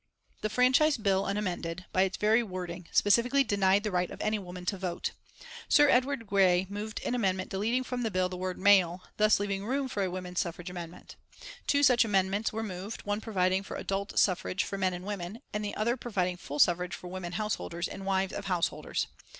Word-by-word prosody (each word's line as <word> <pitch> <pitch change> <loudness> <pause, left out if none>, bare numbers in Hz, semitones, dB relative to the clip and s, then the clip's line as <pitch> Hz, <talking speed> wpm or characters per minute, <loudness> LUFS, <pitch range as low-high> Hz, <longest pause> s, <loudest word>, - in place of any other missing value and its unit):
The 215 - -1
Franchise 255 +6 +4
Bill 195 -3 +1
unamended, 185 -3 -3
by 185 - +3
its 190 0 +1
very 220 +3 +4
wording, 180 -4 -6
specifically 245 +7 +4
denied 200 -3 +2
the 210 - -2
right 180 -1 0
of - - -9
any 215 0 0
woman 180 -1 -8
to 195 - -1
vote. 180 -2 -3 0.6
Sir 290 -1 +6
Edward 255 -1 +2
Grey 190 -2 +3
moved 210 +1 -4
an - - 0
amendment 190 -6 0
deleting 225 +6 0
from 250 -1 -4
the 225 - 0
bill 185 -2 +1
the 180 - -6
word 185 0 -3
male, 185 -3 +4
thus 215 -1 +4
leaving 200 -1 -2
room 265 +5 -1
for 210 -5 -3
a 185 - 0
women's 180 0 -4
suffrage 175 +1 -4
amendment. 175 -1 -9 0.5
Two 285 0 +3
such 250 -4 +6
amendments 200 0 +1
were 225 +1 -3
moved, 195 +1 -6
one 205 +1 -1
providing 190 -3 +1
for 200 - -7
adult 195 +1 -3
suffrage 185 0 +2
for - - -5
men 190 -2 0
and 180 +1 -8
women, 200 +1 -5
and 210 0 -2
the 205 - -4
other 235 +3 +1
providing 190 -8 -1
full 145 -4 -7
suffrage 175 +3 +3
for 180 - -10
women 180 -1 -6
householders 175 -3 -2
and 195 - -8
wives 190 -1 0
of 200 - -5
householders. 180 -3 -1
195 Hz, 200 wpm, -29 LUFS, 180-215 Hz, 0.6 s, Sir